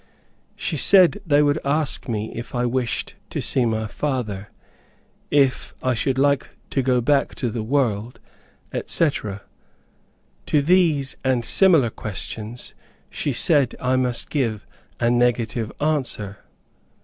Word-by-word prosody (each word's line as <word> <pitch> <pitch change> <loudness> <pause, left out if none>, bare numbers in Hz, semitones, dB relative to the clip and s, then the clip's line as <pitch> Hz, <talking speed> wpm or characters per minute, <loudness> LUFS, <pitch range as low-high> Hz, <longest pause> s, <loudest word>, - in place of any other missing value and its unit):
She - - -3
said 195 +1 +5
they 145 -1 +4
would 145 +1 +2
ask 145 -1 -1
me 110 -1 -2
if 115 +2 -7
I 120 0 +1
wished 120 -1 -1 0.2
to - - -3
see 125 -3 +3
my 110 -1 -1
father; 110 -5 -3 0.8
if 140 -3 +1
I 130 - +2
should 130 +3 -1
like 140 +1 +2 0.2
to 135 - +1
go 125 -1 +2
back 140 +3 +1
to 120 -4 -2
the 115 - -3
world, 115 -2 -1 0.5
etc. 105 - -1 1.0
To 150 - +3
these 160 -5 +2
and 130 -3 +1
similar 165 - +4
questions 110 +3 -6 0.4
she 145 - -2
said 140 0 +2
I 130 0 +1
must 125 -2 -1
give 115 -8 -1 0.3
a 120 0 +2
negative 120 -2 +1
answer. 130 -10 -1
125 Hz, 130 wpm, -22 LUFS, 115-145 Hz, 1.0 s, said